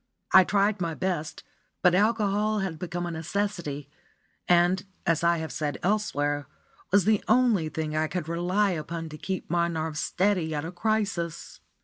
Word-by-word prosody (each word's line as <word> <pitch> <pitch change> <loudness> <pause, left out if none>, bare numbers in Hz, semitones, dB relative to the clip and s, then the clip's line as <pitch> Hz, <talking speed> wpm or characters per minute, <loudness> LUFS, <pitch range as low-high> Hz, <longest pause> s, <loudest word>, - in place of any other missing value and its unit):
I 190 - +9
tried 200 0 +1
my 165 -2 -1
best, 170 -4 -3 0.4
but 180 - +6
alcohol 210 +1 +2
had 180 -5 -4
become 175 0 -3
a 175 - -3
necessity, 165 -4 -3 0.6
and, 175 +1 +4 0.2
as 165 -2 +1
I 170 0 +4
have 160 -1 -4
said 145 -3 -2
elsewhere, 145 -8 0 0.4
was 200 -2 +4
the 215 -1 +3
only 230 -11 +3
thing 155 -1 -3
I 155 0 +1
could 170 -1 -4
rely 180 +5 +1
upon 165 0 -4
to 155 - -9
keep 190 -2 -4
my 170 0 +2
nerves 160 -2 -3
steady 180 -3 0
at 145 +1 -3
a 165 - -5
crisis. 185 -4 -2
175 Hz, 160 wpm, -27 LUFS, 160-200 Hz, 0.6 s, I